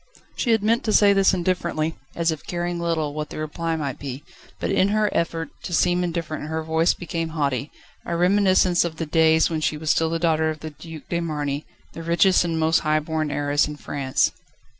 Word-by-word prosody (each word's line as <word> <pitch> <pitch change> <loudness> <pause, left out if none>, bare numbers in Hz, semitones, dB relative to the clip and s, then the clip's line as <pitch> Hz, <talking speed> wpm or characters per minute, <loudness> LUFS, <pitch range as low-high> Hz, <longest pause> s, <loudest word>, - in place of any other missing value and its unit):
She 245 - -2
had 225 -2 +3
meant 230 +3 +2
to 215 - +1
say 205 -1 +6
this 195 -1 +4
indifferently, 170 -3 -1 0.2
as 165 -1 +1
if 155 - -6
caring 175 0 -2
little 165 -3 -1
what 150 0 -4
the - - -8
reply 160 +2 -3
might 140 -4 -4
be: 140 0 -6 0.4
but - - -2
in 190 - +3
her 210 +1 +1
effort 165 -1 -1
to 175 - -6
seem 180 +1 +2
indifferent 165 -3 -3
her 160 0 -3
voice 160 +1 +2
became 165 -2 -4
haughty, 140 -1 -1 0.3
a 170 - -3
reminiscence 185 -1 +4
of 170 -2 -3
the 165 - -3
days 160 +1 +3
when 160 -1 -1
she 155 - 0
still 160 +1 +2
was 165 - -2
the - - -8
daughter 160 -1 +2
of 155 -1 -5
the 155 - -6
Duc 160 +1 -10
de 170 - -1
Marny, 150 -3 -3 0.3
the 165 - -7
richest 170 +3 +3
and 165 -2 -1
most 160 +1 +3
high 155 0 +1
born 155 0 -2
heiress 145 +1 +1
in 150 - -6
France. 140 -2 0
165 Hz, 210 wpm, -23 LUFS, 155-175 Hz, 0.4 s, say